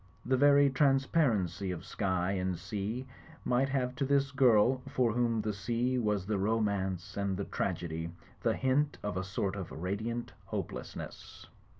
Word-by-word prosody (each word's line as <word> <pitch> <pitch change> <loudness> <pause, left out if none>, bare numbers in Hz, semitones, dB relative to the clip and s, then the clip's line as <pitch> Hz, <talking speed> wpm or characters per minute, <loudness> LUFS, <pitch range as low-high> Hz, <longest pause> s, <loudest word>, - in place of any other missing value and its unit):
The 130 - +3
very 140 +1 +6
transparency 130 - +2
of 90 -1 -5
sky 95 -2 0
and 95 -2 -1
sea 105 +7 -4 0.4
might 130 +2 +2
have 130 -2 0
to - - 0
this 140 0 +2
girl, 130 -2 +4
for 130 -4 +2
whom 115 -2 +1
the 105 0 -2
sea 120 +5 0
was 105 -4 0
the 105 -1 -1
romance 100 -4 0
and 100 -2 0
the 100 - -2
trag 90 -2 -2
edy, 80 0 -4 0.3
the - - +2
hint 135 +3 +1
of 105 -3 -2
a 95 - -1
sort 95 +1 -2
of 95 -4 -6
radiant 110 +8 -3
hopelessness. - - -6
110 Hz, 160 wpm, -32 LUFS, 95-130 Hz, 0.4 s, very